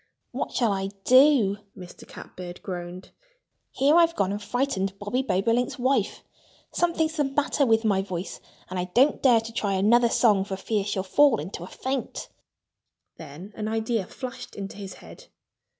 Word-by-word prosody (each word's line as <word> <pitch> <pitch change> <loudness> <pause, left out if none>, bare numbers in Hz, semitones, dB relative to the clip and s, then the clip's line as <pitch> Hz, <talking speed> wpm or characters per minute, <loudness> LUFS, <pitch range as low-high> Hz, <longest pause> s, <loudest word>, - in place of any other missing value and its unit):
"What - - -4
shall 235 -4 +1
I 195 0 -2
do?" 255 -6 +5 0.2
Mr. 180 -2 -12
Catbird 180 -1 -10
groaned. 180 -1 -7 0.6
"Here 285 +4 +2
I've 335 -1 +4
gone 195 - 0
and 205 +1 -4
frightened 205 -4 -2
Bobby 205 +6 -2
Bobolink's 240 +3 0
wife! 260 +2 0 0.5
Something's 325 -2 0
the 295 - +3
matter 280 0 0
with 225 0 +3
my 195 -3 +2
voice. 185 -2 -6 0.3
And 185 0 -4
I 180 - -1
don't 270 +5 +4
dare 240 -4 +5
to 225 0 -9
try 205 -4 -1
another 230 +5 +4
song 210 -5 +3
for 195 0 -5
fear 205 +1 -1
she'll 195 -2 -2
fall 255 +5 +4
into 175 +4 -6
a 175 - -7
faint." 260 +4 -4 0.9
Then 160 +7 -10
an 215 -1 -4
idea 220 -2 -1
flashed 250 -2 -8
into 195 -1 -7
his 195 -2 -8
head. - - -14
220 Hz, 165 wpm, -25 LUFS, 195-255 Hz, 0.9 s, do